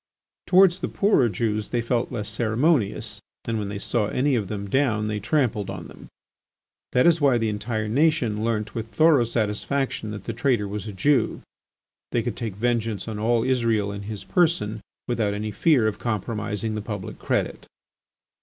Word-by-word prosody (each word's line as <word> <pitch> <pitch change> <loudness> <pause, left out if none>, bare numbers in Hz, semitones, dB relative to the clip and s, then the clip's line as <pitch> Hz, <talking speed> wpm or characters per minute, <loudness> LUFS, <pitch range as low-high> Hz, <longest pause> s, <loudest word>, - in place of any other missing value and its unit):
Towards 185 -1 +5
the - - -2
poorer 195 - +3
Jews 105 +1 -1
they 120 - 0
felt 120 0 -1
less 105 -4 -3
ceremonious 115 +3 +1 0.2
and 115 -1 -1
when 100 -1 -3
they 100 - -4
saw 105 +1 0
any 135 +5 +1
of 110 -6 0
them 100 -1 -4
down 110 -2 +1
they 105 -1 -2
trampled 115 -3 0
on - - -6
them. - - -13 0.9
That 125 - +4
is 170 -2 +4
why 135 -4 +4
the 115 -1 0
entire 110 +1 -2
nation 120 -4 +2
learnt 110 -2 -1
with 115 -1 -4
thorough 150 0 +4
satisfaction 115 +2 -1
that 105 -1 -6
the 115 - -4
traitor 120 -3 +1
was 105 +2 -5
a - - -4
Jew. 120 +5 +1 0.7
They 120 - +1
could 120 -3 -3
take 110 -5 -4
vengeance 115 -1 -1
on 110 -2 -4
all 115 +1 +2
Israel 115 -5 +1
in 100 0 -6
his 105 0 -6
person 160 - +1 0.3
without 110 -4 0
any 105 +1 -3
fear 135 0 +3
of 105 - -2
compromising 110 -1 -2
the 105 - -3
public 105 -3 -6
credit. - - -2
115 Hz, 175 wpm, -24 LUFS, 105-125 Hz, 0.9 s, Towards